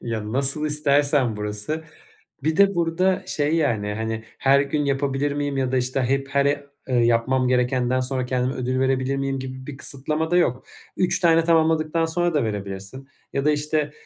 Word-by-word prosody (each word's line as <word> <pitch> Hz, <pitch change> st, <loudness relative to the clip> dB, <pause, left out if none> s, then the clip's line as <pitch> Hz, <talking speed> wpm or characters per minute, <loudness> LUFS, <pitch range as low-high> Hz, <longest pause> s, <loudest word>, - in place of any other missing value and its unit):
Ya, 110 Hz, -2 st, -4 dB
nasıl 140 Hz, +4 st, +1 dB
istersen 145 Hz, -5 st, +2 dB
burası. 105 Hz, +10 st, -4 dB, 0.6 s
Bir 160 Hz, +2 st, 0 dB
de 200 Hz, 0 st, +5 dB
burada, 175 Hz, +2 st, +1 dB
şey, 150 Hz, +1 st, 0 dB
yani, 110 Hz, -9 st, 0 dB
hani, 110 Hz, +1 st, -4 dB
"Her 135 Hz, +1 st, +4 dB
gün 145 Hz, +1 st, -1 dB
yapabilir 140 Hz, +1 st, 0 dB
miyim?" 145 Hz, -1 st, -2 dB
ya 130 Hz, -1 st, -1 dB
da, 130 Hz, -, +2 dB
işte, 130 Hz, +1 st, 0 dB
hep, 135 Hz, +2 st, 0 dB
her 140 Hz, 0 st, +1 dB
e 145 Hz, 0 st, -1 dB, 0.2 s
"Yapmam 120 Hz, +2 st, +2 dB
gerekenden 125 Hz, 0 st, +1 dB
sonra 130 Hz, 0 st, -2 dB
kendime 125 Hz, +1 st, -1 dB
ödül 130 Hz, 0 st, -2 dB
verebilir 130 Hz, 0 st, 0 dB
miyim?" 135 Hz, 0 st, -2 dB
gibi 130 Hz, 0 st, -7 dB
bir 145 Hz, -2 st, -7 dB
kısıtlama 150 Hz, +4 st, 0 dB
da 175 Hz, -, +3 dB
yok. 130 Hz, -8 st, +1 dB, 0.3 s
3 175 Hz, -1 st, +1 dB
tane 165 Hz, -2 st, +4 dB
tamamladıktan 160 Hz, -1 st, +2 dB
sonra 175 Hz, +1 st, 0 dB
da 145 Hz, -, +2 dB
verebilirsin 100 Hz, +5 st, -6 dB, 0.2 s
ya 140 Hz, -, -1 dB
da, 150 Hz, -, +4 dB
işte, 150 Hz, 0 st, -1 dB
135 Hz, 175 wpm, -23 LUFS, 125-150 Hz, 0.6 s, de